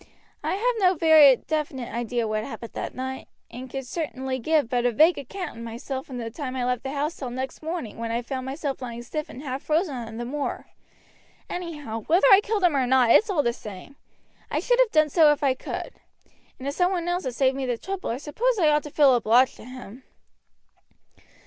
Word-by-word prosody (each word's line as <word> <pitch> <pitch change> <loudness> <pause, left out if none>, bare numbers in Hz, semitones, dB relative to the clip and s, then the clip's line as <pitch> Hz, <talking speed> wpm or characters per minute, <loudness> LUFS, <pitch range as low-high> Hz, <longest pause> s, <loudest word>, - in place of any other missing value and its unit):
I - - 0
have 485 +5 +1
no 370 -2 +4
very 310 -4 +7
definite 285 -4 -4
idea 235 0 -1
what 215 0 -1
happened 230 -2 -8
that - - -5
night, 260 +1 -5 0.2
and 255 +2 -9
certainly 265 -3 -3
could - - -12
give 310 -3 +2
but 245 -1 0
a 245 - +2
vague 315 +9 +4
account 300 0 -7
of - - -7
myself 260 +4 -6
from 260 - -7
the 230 -1 -5
time 260 0 -5
I 250 -1 -1
left 250 -1 0
the 270 - -5
house 295 +3 -2
till 260 - -5
next 260 +2 -5
morning, 320 -8 -5
when 230 0 -3
I 235 +1 -1
found 260 +1 -5
myself 275 0 -4
lying 240 -1 -6
stiff 305 +5 -5
and 265 - -9
half 265 -1 -4
frozen 315 0 0
on 225 -2 -7
the 240 - -4
moor. 285 +3 -4 0.9
Anyhow, 295 -10 -5
whether 345 +4 +4
I 390 - +9
killed 420 -2 -2
him 345 -5 +4
or 260 -2 +1
not 250 -2 +4
it's 430 - +5
all 330 -7 +1
the 235 - +1
same. 210 +5 -10 0.5
I - - 0
should - - +1
have - - +5
done 310 -1 +4
so 315 -2 +6
if 290 - -7
I 270 -2 +3
could. 255 - -6 0.7
And 265 - -7
if 280 - -1
some 360 +4 +2
one 350 -2 -2
else 355 +1 -1
has 255 -2 -3
saved 265 -1 +3
me 270 -1 -3
the 245 -2 -1
trouble 385 +8 -5
I 230 - -2
suppose 445 - -1
I 325 -5 +4
ought 300 0 +3
to 295 - -9
feel 285 -2 +5
obliged 240 +2 +4
to - - -12
him." 255 -1 -10
270 Hz, 225 wpm, -25 LUFS, 245-315 Hz, 0.9 s, I